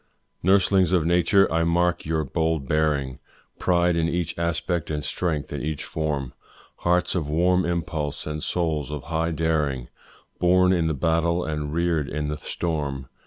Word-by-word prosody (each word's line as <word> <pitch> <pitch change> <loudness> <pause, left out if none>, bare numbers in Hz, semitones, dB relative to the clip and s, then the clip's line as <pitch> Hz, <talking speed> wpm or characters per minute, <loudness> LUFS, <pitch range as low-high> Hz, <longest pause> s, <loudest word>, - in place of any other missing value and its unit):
Nurslings 95 -1 +3
of 85 -4 +3
nature, 90 +3 +4
I 80 0 +2
mark 85 0 +1
your 80 -1 0
bold 80 -1 -1
bearing, 75 -4 0 0.4
Pride 90 -1 +2
in 85 0 +1
each 85 -1 -2
aspect 85 0 -1
and 75 -1 -2
strength 75 +2 -2
in - - -3
each 75 0 -3
form, 75 -5 -3 0.4
Hearts 90 +1 +1
of 80 -5 -2
warm 90 +4 +2
impulse, 80 -4 -2
and 75 0 -4
souls 80 -5 -1
of 75 -3 -5
high 80 +1 -1
daring, 75 -6 -1 0.5
Born 90 +1 +4
in 85 -3 +1
the 80 - 0
battle 85 +4 +1
and 75 -2 -3
rear'd 85 -3 0
in 75 0 -3
the 75 - -3
storm. 70 -5 -3
80 Hz, 160 wpm, -24 LUFS, 75-85 Hz, 0.5 s, nature